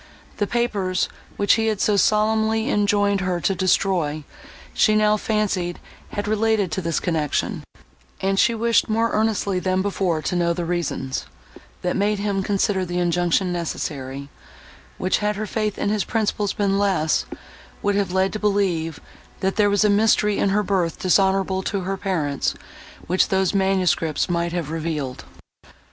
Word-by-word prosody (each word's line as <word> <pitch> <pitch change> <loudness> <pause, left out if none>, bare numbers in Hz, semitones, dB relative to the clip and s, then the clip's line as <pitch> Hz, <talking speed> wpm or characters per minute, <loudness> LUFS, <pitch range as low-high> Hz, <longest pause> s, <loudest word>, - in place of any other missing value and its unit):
The 205 - 0
papers, 200 -6 0 0.3
which 200 - +4
he 225 - +1
had 215 -3 0
so 210 - +2
solemnly 220 +4 +2
enjoined 205 -1 +2
her 185 -1 -1
to 195 - +1
destroy, 175 -5 +1 0.5
she 215 - +3
now 215 0 +4
fancied 200 -5 -1 0.3
had 205 - -3
related 215 -3 +1
to 190 - -2
this 165 -2 -1
connection, 155 -4 -1 0.6
and 195 0 0
she 235 - +3
wished 230 0 +2
more 225 +1 +1
earnestly 210 -3 0
than 185 0 0
before 185 -5 -1
to - - -1
know 170 -1 +2
the 175 0 -3
reasons, 165 - -3 0.6
that 180 - 0
made 205 +1 +1
him 200 -1 -1
consider 195 -1 0
the 175 0 -3
injunction 175 +1 +1
necessary, 140 -5 -4 0.7
which, 185 0 0
had 210 0 0
her 215 +2 -3
faith 215 0 -2
in - - -1
his 210 -1 +1
principles 210 -3 -1
been 200 -1 +1
less, 185 -6 +1 0.6
would 205 - +2
have 200 -2 0
led 190 +1 +1
to 215 - -3
believe, 190 -7 0 0.4
that 190 0 0
there 205 -1 +3
was 205 +1 +2
a - - +6
mystery 210 0 +3
in 200 - +2
her 210 +2 +2
birth 180 -5 0
dishonourable 190 0 +2
to 195 0 -2
her 190 +2 -2
parents, 165 -8 -1 0.5
which 185 +2 +2
those 190 0 +1
manuscripts 190 -5 +1
might 170 -1 -1
have 165 -4 -3
revealed. 155 -5 -4
195 Hz, 160 wpm, -22 LUFS, 175-210 Hz, 0.7 s, a